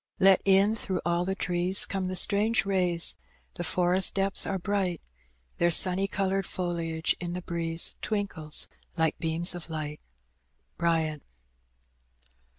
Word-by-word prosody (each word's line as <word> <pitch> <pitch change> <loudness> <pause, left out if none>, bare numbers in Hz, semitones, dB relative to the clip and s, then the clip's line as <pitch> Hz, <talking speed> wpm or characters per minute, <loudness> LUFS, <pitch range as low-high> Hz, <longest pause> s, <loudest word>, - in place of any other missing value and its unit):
Let 195 -1 +4
in 195 +2 +3
through 190 -4 -3
all 170 +1 0
the 190 +1 -3
trees 180 +1 +2
Gome 190 -1 -4
the 185 - -4
strange 210 +3 +2
rays; 180 -3 -1 0.4
the 175 - -6
forest 180 +2 +2
depths 195 0 +4
are 195 - -2
bright, 185 -3 -2 0.6
Their 170 - +3
sunny 185 +3 +3
coloured 195 0 -2
foliage 170 -2 -2
in 175 -1 -5
the 180 - -5
breeze 165 -1 +2
Twinkles 190 -8 +1 0.3
like 160 -1 0
beams 165 +2 +1
of 175 -1 -8
light. 150 -2 -6 0.8
Bryant. 160 -3 -1
180 Hz, 135 wpm, -27 LUFS, 170-195 Hz, 0.8 s, Let